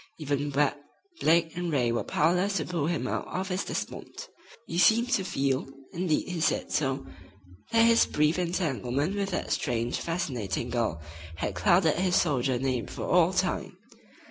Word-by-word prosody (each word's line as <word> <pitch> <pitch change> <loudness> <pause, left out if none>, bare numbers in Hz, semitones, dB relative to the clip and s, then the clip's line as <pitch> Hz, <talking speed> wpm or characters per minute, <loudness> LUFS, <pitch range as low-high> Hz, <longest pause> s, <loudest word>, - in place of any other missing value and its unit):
Even 145 -1 -2
Webb, 145 0 +2 0.4
Blake 165 0 +3
and 175 -1 -2
Ray 125 -5 +2
were 120 - -1
powerless 180 +6 +1
to 155 - -1
pull 170 -5 -2
him 160 -7 -1
out - - -3
of 190 +1 -3
his 185 +1 -1
despond. - - -6 0.4
He 170 - -3
seemed 235 +6 +4
to 205 -7 +2
feel, 135 -6 -1 0.3
indeed 170 -3 0
he 180 -2 -3
said - - 0
so, 135 -2 0 0.7
that 230 0 +5
his 230 0 +5
brief 150 +3 +1
entanglement 155 -3 -1
with 200 -1 -1
that 185 - -3
strange, 120 -2 -1
fascinating 125 - -3
girl 110 -10 -1 0.3
had 95 +4 -3
clouded 160 - +3
his 180 0 +1
soldier 135 -7 +2
name 125 -3 -1
for - - -6
all - - +4
time. - - -1
155 Hz, 165 wpm, -28 LUFS, 130-180 Hz, 0.7 s, that